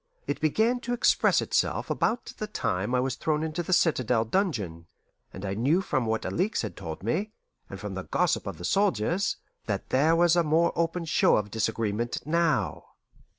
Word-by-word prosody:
It -, -, -3 dB
began 220 Hz, -, +2 dB
to 245 Hz, 0 st, -3 dB
express 245 Hz, -, +3 dB
itself -, -, 0 dB
about 235 Hz, +2 st, -1 dB
the 215 Hz, -, -3 dB
time 105 Hz, -, -1 dB
I -, -, +3 dB
was 130 Hz, 0 st, 0 dB
thrown 155 Hz, -1 st, -1 dB
into 160 Hz, +1 st, -2 dB
the 175 Hz, -, -5 dB
citadel 125 Hz, -10 st, +2 dB
dungeon, 105 Hz, -, -2 dB, 0.4 s
and 95 Hz, -, -7 dB
I 95 Hz, -, -2 dB
knew 135 Hz, -, +2 dB
from 130 Hz, -10 st, -1 dB
what 110 Hz, 0 st, -1 dB
Alixe 195 Hz, -, 0 dB
had 110 Hz, -, -5 dB
told 80 Hz, +2 st, -7 dB
me, 195 Hz, -, -1 dB, 0.4 s
and -, -, -8 dB
from -, -, -5 dB
the -, -, -5 dB
gossip -, -, 0 dB
of -, -, -5 dB
the -, -, -6 dB
soldiers, 195 Hz, -, +1 dB, 0.3 s
that 100 Hz, -3 st, -3 dB
there 150 Hz, +5 st, +3 dB
was 170 Hz, 0 st, +4 dB
a 175 Hz, -, +4 dB
more 165 Hz, +1 st, +2 dB
open 170 Hz, +1 st, -1 dB
show 155 Hz, -, +3 dB
of 105 Hz, -1 st, -3 dB
disagreement 110 Hz, +1 st, -2 dB
now. 165 Hz, -2 st, 0 dB
155 Hz, 185 wpm, -27 LUFS, 110-175 Hz, 0.4 s, was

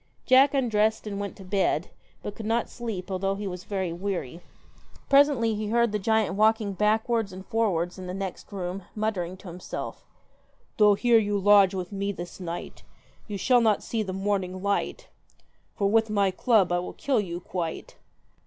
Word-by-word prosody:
Jack 265 Hz, +2 st, +5 dB
undressed 220 Hz, -5 st, +1 dB
and 200 Hz, -1 st, -4 dB
went 200 Hz, -1 st, -4 dB
to 195 Hz, -, -12 dB
bed, 185 Hz, -3 st, 0 dB, 0.3 s
but 205 Hz, -, -5 dB
could 215 Hz, 0 st, -7 dB
not 230 Hz, +1 st, 0 dB
sleep, 210 Hz, -6 st, -5 dB
although 195 Hz, +1 st, 0 dB
he 205 Hz, +1 st, -5 dB
was 180 Hz, -2 st, -6 dB
very 190 Hz, -4 st, -2 dB
weary. 175 Hz, -4 st, -4 dB, 0.7 s
Presently 275 Hz, -5 st, +5 dB
he 215 Hz, 0 st, -3 dB
heard 235 Hz, +1 st, +2 dB
the 210 Hz, -, -1 dB
giant 220 Hz, 0 st, +1 dB
walking 215 Hz, 0 st, +2 dB
backwards 220 Hz, +1 st, +1 dB
and 190 Hz, +1 st, -9 dB
forwards 190 Hz, -6 st, 0 dB
in 185 Hz, -, -7 dB
the 180 Hz, -, -4 dB
next 195 Hz, 0 st, -6 dB
room, 185 Hz, -1 st, -4 dB
muttering 190 Hz, -5 st, -2 dB
to 190 Hz, -, -13 dB
himself 180 Hz, +1 st, -7 dB, 0.7 s
'Though 210 Hz, -1 st, +6 dB
here 235 Hz, +2 st, +4 dB
you 205 Hz, -1 st, 0 dB
lodge 200 Hz, -1 st, +5 dB
with 180 Hz, 0 st, -4 dB
me 200 Hz, 0 st, -2 dB
this 175 Hz, -2 st, -8 dB
night, 175 Hz, -2 st, -6 dB, 0.5 s
You 205 Hz, -2 st, -4 dB
shall 245 Hz, +4 st, +4 dB
not 220 Hz, -3 st, +2 dB
see 225 Hz, -, -2 dB
the 195 Hz, -3 st, -3 dB
morning 190 Hz, -1 st, -2 dB
light, 200 Hz, 0 st, -1 dB, 0.7 s
For 200 Hz, -, +1 dB
with 220 Hz, +2 st, +3 dB
my 200 Hz, -2 st, +2 dB
club 200 Hz, -2 st, +3 dB
I 175 Hz, -, +2 dB
will 180 Hz, -, -6 dB
kill 270 Hz, -4 st, 0 dB
you 175 Hz, -4 st, -3 dB
quite.' 170 Hz, -2 st, -5 dB
200 Hz, 180 wpm, -26 LUFS, 185-220 Hz, 0.7 s, Though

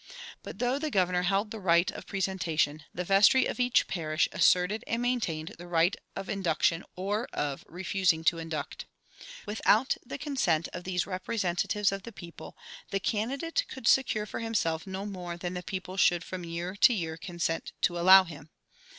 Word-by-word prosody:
But -, -, -9 dB
though 250 Hz, +4 st, 0 dB
the 310 Hz, +1 st, -2 dB
governor 180 Hz, -6 st, +1 dB
held 195 Hz, +4 st, 0 dB
the 220 Hz, -, -6 dB
right 170 Hz, -2 st, +3 dB
of -, -, -10 dB
presentation, 165 Hz, -6 st, -1 dB
the 180 Hz, -, -4 dB
vestry 195 Hz, +8 st, +5 dB
of -, -, -4 dB
each 250 Hz, -1 st, +3 dB
parish 155 Hz, -3 st, 0 dB
asserted 180 Hz, +4 st, +3 dB
and 230 Hz, -, -1 dB
maintained 225 Hz, -11 st, -2 dB
the 175 Hz, -, -9 dB
right 175 Hz, +2 st, +2 dB, 0.2 s
of 195 Hz, -, -5 dB
induction 170 Hz, -2 st, 0 dB
or 205 Hz, +5 st, -2 dB
of 145 Hz, -2 st, -3 dB
refusing 180 Hz, -2 st, 0 dB
to 165 Hz, +1 st, +2 dB
induct. 160 Hz, -3 st, -5 dB, 0.6 s
Without 220 Hz, +3 st, +2 dB
the 255 Hz, -, -7 dB
consent 230 Hz, -, 0 dB
of 175 Hz, -, -7 dB
these 180 Hz, -2 st, -1 dB
representatives 195 Hz, 0 st, -1 dB
of 195 Hz, 0 st, -4 dB
the 230 Hz, -, -9 dB
people 175 Hz, -5 st, -11 dB, 0.3 s
the 195 Hz, -, -1 dB
candidate 270 Hz, -, -1 dB
could 265 Hz, -4 st, -6 dB
secure 225 Hz, -5 st, +3 dB
for -, -, -6 dB
himself 200 Hz, -8 st, -1 dB
no 190 Hz, +1 st, -5 dB
more 180 Hz, -4 st, -6 dB
than 175 Hz, +1 st, -4 dB
the 180 Hz, -, -4 dB
people 185 Hz, 0 st, -6 dB
should 175 Hz, -2 st, +3 dB
from 185 Hz, -1 st, -6 dB
year 170 Hz, +2 st, -5 dB
to 240 Hz, +3 st, +6 dB
year 165 Hz, -5 st, -3 dB
consent 170 Hz, -1 st, -3 dB
to 175 Hz, 0 st, +1 dB
allow 190 Hz, +2 st, +8 dB
him. 155 Hz, -3 st, -11 dB
185 Hz, 175 wpm, -29 LUFS, 170-210 Hz, 0.6 s, allow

